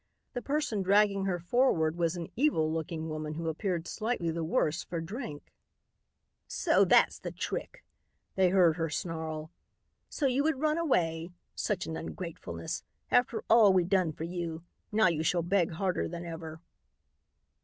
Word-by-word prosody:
The 245 - -3
person 280 -5 -1
dragging 200 0 +3
her 185 -2 0
forward 175 -4 +2
was 170 0 0
an 170 -2 -6
evil 190 - +2
looking 160 0 -3
woman 155 -1 -4
who 165 +1 -4
appeared 170 0 -2
slightly 215 -7 -1
the 165 0 -3
worse 160 0 0
for 170 - -4
drink. 165 - -7 0.9
"So - - +3
that's - - +4
the - - -5
trick," - - -5 0.5
they 190 -1 +3
heard 175 -3 +4
her 165 -1 -1
snarl. 160 0 -4 0.6
"So 295 - -2
you 265 +1 +3
would 305 -2 +1
run 310 +2 +1
away! 165 - +1 0.2
Such 195 -3 -1
an 160 - -4
ungratefulness. 160 - -5 0.3
After 245 -2 +2
all 220 -4 +7
we 185 -1 +4
done 185 -2 +2
for 155 - -7
you. 170 -1 -4 0.3
Now 215 -1 +4
you 165 -3 +1
shall 170 +2 +1
beg 175 -1 +1
harder 185 +2 -1
than 170 0 -6
ever." 160 -1 -7
175 Hz, 155 wpm, -30 LUFS, 160-205 Hz, 0.9 s, all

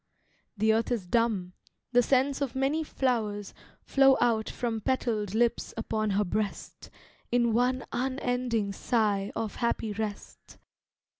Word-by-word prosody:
The 220 +2 +3
earth 225 +1 +1
is 225 -6 -1
dumb, 200 -3 0 0.4
the 245 0 +5
scents 270 +3 +2
of 265 -3 -2
many 275 +4 +1
flowers 220 -8 -1 0.3
Flow 270 -1 +5
out 225 -2 +2
from 230 -3 -3
petalled 220 -5 -1
lips 235 +1 +1
upon 215 -1 -1
her 210 - +2
breast, 205 +3 -4 0.4
In 240 -1 +3
one 250 +2 +1
unending 245 -5 -1
sigh 205 -3 0
of 220 -2 -3
happy 225 -2 -1
rest. 210 -1 -6
230 Hz, 130 wpm, -28 LUFS, 210-250 Hz, 0.4 s, the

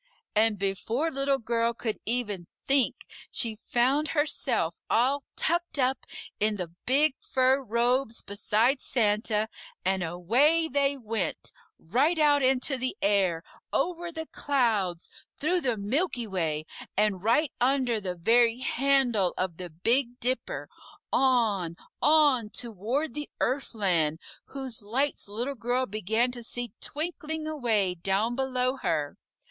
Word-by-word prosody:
And 215 0 +3
before 220 - -1
Little 275 0 +1
Girl 235 -1 0
could 225 -2 -3
even 210 -7 -1 0.2
think, 275 -2 +2 0.2
she 230 -3 0
found 260 +7 +1
herself 295 +1 0
all 265 +5 +3
tucked 345 -1 0
up 260 -1 0 0.3
in 215 0 +2
the 180 -4 -4 0.2
big 285 +3 +4
fur 260 +1 +2
robes 240 0 0
beside 220 +6 +1
Santa, 215 -2 +1 0.4
and 190 0 +1
away 240 - +3
they 280 0 +1
went, 225 -5 -2 0.3
right 270 - +1
out 295 -2 +4
into 265 +1 +2
the 255 +1 -2
air, 190 -5 +2 0.3
over 345 -1 -1
the 320 -1 -5
clouds, 215 -11 0 0.3
through 355 +4 +1
the 245 -6 0
Milky 245 - 0
Way, 160 -6 -2 0.3
and 205 -3 +2
right 245 +7 +3
under 250 -3 +2
the 180 -2 -3
very 230 +6 +3
handle 255 -7 +2
of 185 -3 -2
the 180 -1 -6
Big 235 - 0
Dipper, 255 +2 -1 0.5
on, 220 -10 +2 0.3
on, 290 -7 +4
toward 235 - -2
the 295 -1 -5
Earthland, 195 - +1 0.3
whose 265 -5 -3
lights 255 +7 -1
Little 235 +7 -3
Girl 250 +1 -1
began 220 +3 0
to 245 -1 -7
see 240 0 -4
twinkling 315 0 -3
away 230 -11 +1
down 195 +7 0
below 255 0 0
her. 145 - -1
240 Hz, 130 wpm, -28 LUFS, 210-275 Hz, 0.5 s, big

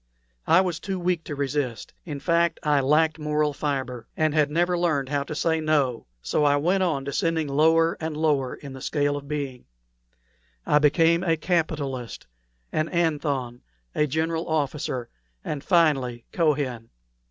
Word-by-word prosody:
I 185 - +6
was 175 -3 -2
too 190 -2 -4
weak 175 -2 0
to 145 - -5
resist; 140 -4 -3
in 150 -5 -5
fact, 170 +2 +1
I 150 -1 +3
lacked 155 +4 +2
moral 150 -1 0
fibre, 130 -5 -3
and 155 -1 +2
had 150 -1 +3
never 175 +3 +1
learned 155 -6 0
how 145 -1 0
to 145 +2 -5
say 160 +1 +1
'No.' 145 - 0 0.2
So 150 - +1
I 145 -1 +4
went 175 +7 +1
on, 160 -7 0
descending 160 +2 -1
lower 160 +4 +3
and 160 -1 -4
lower 145 -5 +1
in 140 -2 -10
the 130 - -9
scale 145 +1 0
of 140 -1 -7
being. 140 -4 -4 1.0
I 150 - +4
became 165 +3 +4
a 165 -3 +2
capitalist, 150 -7 -2 0.5
an 155 +1 0
Athon, 145 -7 -1 0.3
a 150 - +1
general 160 +3 -1
officer, 145 -5 -1 0.4
and 150 -2 -4
finally 135 -9 +2
Kohen. 140 -8 0
150 Hz, 155 wpm, -25 LUFS, 140-165 Hz, 1.0 s, I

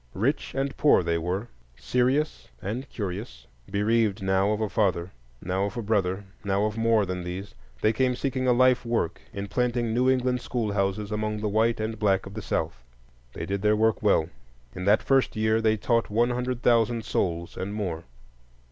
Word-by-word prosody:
Rich 130 +10 -1
and 135 0 -1
poor 145 -10 +5
they 85 0 0
were, 90 +7 -2 0.3
serious 130 - 0
and 120 +8 -5
curious. 95 - -5 0.2
Bereaved 105 0 +1
now 95 +1 +2
of 105 - 0
a 110 - 0
father, 95 -4 0 0.3
now 95 +2 0
of 100 - -5
a 120 - -2
brother, 100 -2 0 0.2
now 100 +1 +1
of 105 0 -2
more 115 -2 +3
than 90 -1 -4
these, 95 +3 -6 0.3
they 110 - +3
came 125 +2 +1
seeking 130 0 -1
a - - +5
life 125 0 +4
work 115 -8 -1
in 100 0 -5
planting 120 -1 0
New 125 +2 +3
England 125 -1 +1
schoolhouses 105 -4 -1
among 105 0 -2
the 105 - 0
white 110 +3 +2
and 110 0 -3
black 95 -3 +2
of 95 - -9
the - - -5
South. - - -3 0.5
They - - -5
did 100 +2 -2
their 105 +1 +3
work 110 0 +2
well. 100 -7 +3 0.5
In 90 0 -5
that 105 +2 +4
first 135 -1 +2
year 110 +1 +2
they 110 -1 +2
taught 115 +2 +1
one 120 +4 +2
hundred 125 0 -2
thousand 115 -1 +3
souls, 85 -2 -1
and 95 +2 -4
more. 90 -6 -3
110 Hz, 185 wpm, -26 LUFS, 95-120 Hz, 0.5 s, poor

